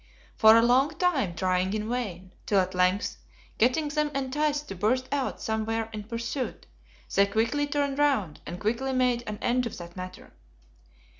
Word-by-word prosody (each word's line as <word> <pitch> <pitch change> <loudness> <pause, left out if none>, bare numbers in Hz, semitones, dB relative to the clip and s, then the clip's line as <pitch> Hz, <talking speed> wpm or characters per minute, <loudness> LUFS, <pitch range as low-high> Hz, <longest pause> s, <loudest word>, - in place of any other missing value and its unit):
For 220 0 +7
a 230 - +5
long 265 +6 +3
time 275 - +1
trying 185 +1 0
in 215 0 -3
vain, 190 -7 -4
till 200 - +4
at 185 0 0
length, 180 +2 +1 0.4
getting 255 +7 +2
them 300 0 0
enticed 290 +2 -1
to - - -4
burst 250 +7 +1
out 275 -2 -1
somewhere 225 0 -2
in 210 -1 -6
pursuit, 235 +2 -4 0.5
they 200 0 +4
quickly 230 +8 0
turned 285 -1 -1
round, 260 - +1
and 175 +1 -6
quickly 240 +5 -1
made 250 -2 +2
an 210 0 -4
end, 250 0 +1
of - - -8
that 175 0 -10
matter. 185 0 -9
230 Hz, 165 wpm, -27 LUFS, 200-270 Hz, 0.5 s, For